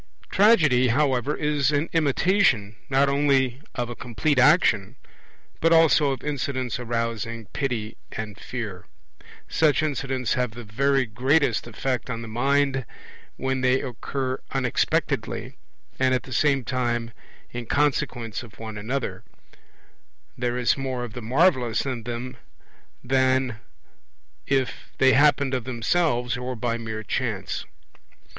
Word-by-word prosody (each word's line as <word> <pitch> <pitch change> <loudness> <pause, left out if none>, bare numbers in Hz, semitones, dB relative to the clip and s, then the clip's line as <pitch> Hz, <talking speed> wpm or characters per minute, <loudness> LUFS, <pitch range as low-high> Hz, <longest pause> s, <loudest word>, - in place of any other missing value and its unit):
Tragedy, 155 - +5
however, 135 +1 +1
is 150 -2 +1
an 150 +2 +1
imitation 150 - +2
not 140 +1 +3
only 140 -2 +2
of 120 -1 -2
a 120 - -6
complete 130 +5 0
action, 130 - +4 0.6
but 165 - +3
also 160 -3 +5
of 135 - -5
incidents 130 -4 -2
arousing 115 -1 -3
pity 120 -6 -2 0.2
and 105 -2 -6
fear. 105 -8 -6 0.6
Such 155 -1 +2
incidents 135 -4 -1
have 125 -4 -1
the 120 - -7
very 135 +5 +1
greatest 125 +2 +1
effect 125 +2 -3
on 115 -1 -4
the - - -7
mind 135 +3 +1 0.5
when 130 0 -1
they 130 +1 +3
occur 130 +1 -3
unexpectedly 130 - -1 0.4
and 130 0 +3
at 125 - -2
the 130 - -8
same 140 -2 +2
time 120 -1 -1 0.4
in 120 -1 -6
consequence 125 -6 0
of 120 -4 -13
one 110 -2 -7
another; 125 +5 -3 1.1
there 120 0 -1
is 125 -2 +2
more 130 -2 -3
of 120 -3 -7
the 125 - -6
marvellous 130 -1 +2
in 130 -4 -3
them 125 +1 -5 0.7
then 130 +1 +2
than 110 -3 -8 0.9
if 135 -2 -1
they 130 0 +5
happened 140 -1 +4
of 125 -3 -1
themselves 125 0 0
or 125 +1 -4
by 115 0 -1
mere 110 -2 -5
chance. - - -3
130 Hz, 130 wpm, -25 LUFS, 120-140 Hz, 1.1 s, Tragedy